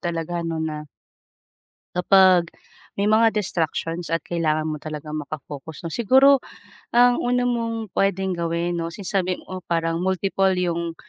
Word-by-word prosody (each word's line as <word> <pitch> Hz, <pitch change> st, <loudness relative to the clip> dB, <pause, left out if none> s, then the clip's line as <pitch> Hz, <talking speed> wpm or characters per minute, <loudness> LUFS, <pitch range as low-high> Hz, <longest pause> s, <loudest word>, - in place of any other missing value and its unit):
talaga 170 Hz, 0 st, -3 dB
'no 165 Hz, -1 st, -3 dB
na 155 Hz, -1 st, -4 dB, 1.1 s
kapag 180 Hz, -1 st, +5 dB, 0.5 s
may 200 Hz, -, 0 dB
mga 220 Hz, +1 st, +4 dB
distractions 170 Hz, -3 st, -2 dB
at 165 Hz, -, +1 dB
kailangan 155 Hz, -2 st, -1 dB
mo 155 Hz, -, -2 dB
talagang 155 Hz, 0 st, -6 dB
maka-focus 150 Hz, +1 st, -8 dB
'no? -, -, -2 dB
Siguro 265 Hz, +4 st, +5 dB, 0.5 s
ang 245 Hz, 0 st, +5 dB
una 245 Hz, 0 st, +1 dB
mong 230 Hz, -4 st, -2 dB
puwedeng 190 Hz, -1 st, 0 dB
gawin 170 Hz, +1 st, -1 dB
'no 165 Hz, 0 st, -3 dB
since 200 Hz, 0 st, -7 dB
sabi 185 Hz, -2 st, 0 dB
mo 185 Hz, -1 st, -8 dB
parang 165 Hz, 0 st, -1 dB
multiple 190 Hz, +1 st, +1 dB
yung 170 Hz, -2 st, -1 dB
175 Hz, 140 wpm, -23 LUFS, 165-195 Hz, 1.1 s, kapag